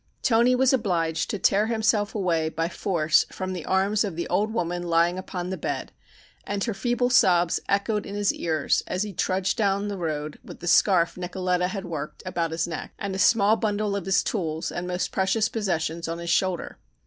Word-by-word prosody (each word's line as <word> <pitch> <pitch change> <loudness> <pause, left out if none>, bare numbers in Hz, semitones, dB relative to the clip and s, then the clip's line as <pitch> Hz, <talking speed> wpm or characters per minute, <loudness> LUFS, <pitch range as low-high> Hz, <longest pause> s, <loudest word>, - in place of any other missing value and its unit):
Toni 240 +1 +4
was 260 +1 +3
obliged 165 -9 0
to - - -2
tear 200 +3 +2
himself 220 -2 +1
away 170 -6 +1
by 165 +1 -2
force 170 -3 +1
from 185 0 -4
the 175 -3 -6
arms 195 +3 +2
of 195 -6 -4
the 170 - -3
old 215 +2 +1
woman 175 -5 -2
lying 170 +1 +2
upon 180 -1 -5
the 190 - -3
bed, - - -3 0.5
and 200 -1 -3
her 230 - -1
feeble 245 +4 0
sobs 175 -7 +4
echoed 205 +1 0
in 200 - -6
his 205 -1 +1
ears 160 -3 0
as 185 - -1
he 210 -2 -6
trudged 185 +3 0
down 200 -1 +1
the 200 -2 -4
road 155 -3 -3
with - - -11
the - - -8
scarf 175 -2 +4
Nicoletta 180 0 -1
had 195 0 -5
worked 150 -3 -6
about 175 -3 -1
his 160 +1 -1
neck, 165 - -6
and 200 -1 -4
a 190 - -3
small 210 +1 +4
bundle 210 -2 -1
of 200 -3 -3
his 190 0 +2
tools 160 -6 -2
and 175 +1 -4
most 180 0 -2
precious 210 +3 +1
possessions 170 -6 -2
on 165 0 -3
his 170 0 -3
shoulder. 185 -1 0
185 Hz, 200 wpm, -25 LUFS, 170-205 Hz, 0.5 s, Toni